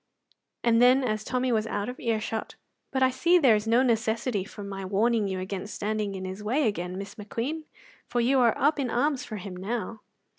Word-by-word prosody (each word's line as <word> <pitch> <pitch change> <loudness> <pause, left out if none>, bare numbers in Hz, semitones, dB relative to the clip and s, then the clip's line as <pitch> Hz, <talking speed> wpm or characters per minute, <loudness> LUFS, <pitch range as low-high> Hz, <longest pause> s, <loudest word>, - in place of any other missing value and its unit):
And 235 -1 +4
then, 255 +2 +6
as 215 -3 -1
Tommy 255 +1 0
was 220 -1 +1
out 205 -1 -2
of 250 - -6
ear 225 -2 0
shot: 220 +1 -4 0.3
"But 265 -1 +1
I 260 - +4
see 345 +7 +4
there 265 -10 +5
is 210 +1 -2
no 235 +3 +4
necessity 225 -2 0
for 205 +1 -9
my 195 -1 -6
warning 210 +3 +1
you 190 -1 -3
against 195 +2 -5
standing 210 -1 -2
in 190 0 -5
his 190 +2 -6
way 250 +6 +1
again, 180 -3 -3
Miss 200 +1 -6
McQueen, 245 +9 -4 0.4
for 245 - -1
you 260 +3 +3
are 235 -3 +4
up 295 +2 +2
in 260 -3 0
arms 270 +3 +1
for 215 - -6
him 185 -1 -7
now." 220 +3 -4
225 Hz, 215 wpm, -27 LUFS, 205-250 Hz, 0.4 s, then